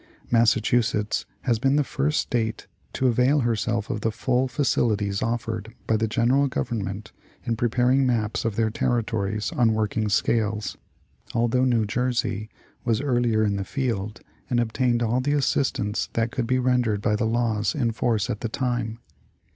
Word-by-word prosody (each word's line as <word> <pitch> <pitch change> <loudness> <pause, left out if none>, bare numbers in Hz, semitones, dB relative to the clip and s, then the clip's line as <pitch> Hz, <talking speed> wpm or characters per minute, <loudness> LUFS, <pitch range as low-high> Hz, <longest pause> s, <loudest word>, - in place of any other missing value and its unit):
Massa 115 -1 +4
chusetts 110 -2 0 0.2
has 115 -3 +1
been 135 +3 +2
the 150 - +3
first 150 +2 0
State 115 -3 -2 0.3
to 130 - -1
avail 125 +4 +3
herself 115 -1 -1
of 110 -4 -3
the 110 - +1
full 130 +3 0
facili 120 -4 +1
ties 100 -1 -2
offered 115 -1 -3
by 110 - +2
the 110 +1 +1
General 125 +5 +2
Government 105 -5 -3 0.3
in 115 -2 -1
preparing 125 +3 +2
maps 115 -4 0
of 115 -3 -1
their 110 0 +1
territories 110 -3 -1
on 115 -3 +2
working 110 0 0
scales, 105 -1 0 0.6
although 120 +2 +2
New 120 -4 +2
Jersey 115 -2 -1 0.3
was 115 -2 +1
earlier 120 -5 +1
in 100 -2 +1
the 100 - -2
field 110 -2 -3 0.3
and 120 -2 +2
obtained 120 +1 +1
all 120 +3 +1
the 145 +3 0
assistance 130 -7 0
that 115 0 0
could 120 -3 -2
be 130 +1 +2
rendered 125 -4 +1
by 105 0 +1
the 110 - 0
laws 110 -2 0
in 120 -6 +1
force 110 -2 0
at 105 - -4
the 115 - -2
time. 120 -3 -2
115 Hz, 165 wpm, -25 LUFS, 110-125 Hz, 0.6 s, Massa